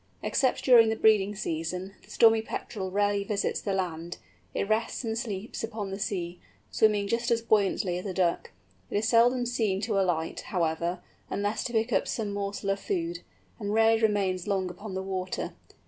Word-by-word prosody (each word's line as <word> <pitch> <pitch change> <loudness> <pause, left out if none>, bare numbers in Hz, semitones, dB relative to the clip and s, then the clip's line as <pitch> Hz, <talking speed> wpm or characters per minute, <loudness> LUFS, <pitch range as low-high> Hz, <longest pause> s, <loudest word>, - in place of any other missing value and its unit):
Except 260 -2 +1
during 235 -4 +7
the 220 - 0
breeding 210 -2 +3
season, 180 +1 -3
the - - -20
Stormy 225 -1 +5
Petrel 200 -3 -5
rarely 205 +1 +1
visits 200 0 -1
the 200 - -2
land; 175 -2 -3 0.3
it - - -2
rests 220 +4 0
and 225 -1 -2
sleeps 220 -2 -4
upon 215 -3 -4
the 195 - -5
sea, 180 -4 -3 0.3
swimming 205 - +3
just 235 +3 0
as 230 -1 +1
buoyantly 200 -4 +2
as 180 - -9
a 190 - -3
Duck. 175 -3 +1 0.4
It - - -1
is 215 +2 +1
seldom 245 +2 +4
seen 225 -6 0
to 210 -2 0
alight, 165 -3 -1
however, 170 -1 -1 0.3
unless 205 +2 -1
to 245 - -4
pick 225 +2 +1
up - - +2
some 210 -3 -2
morsel 200 0 -2
of 195 - -1
food, 170 -3 -2 0.4
and 205 -1 -2
rarely 225 0 +4
remains 195 -4 +1
long 190 -3 0
upon 195 +2 -8
the 190 - -2
water. 185 -1 -3
200 Hz, 180 wpm, -28 LUFS, 185-220 Hz, 0.4 s, during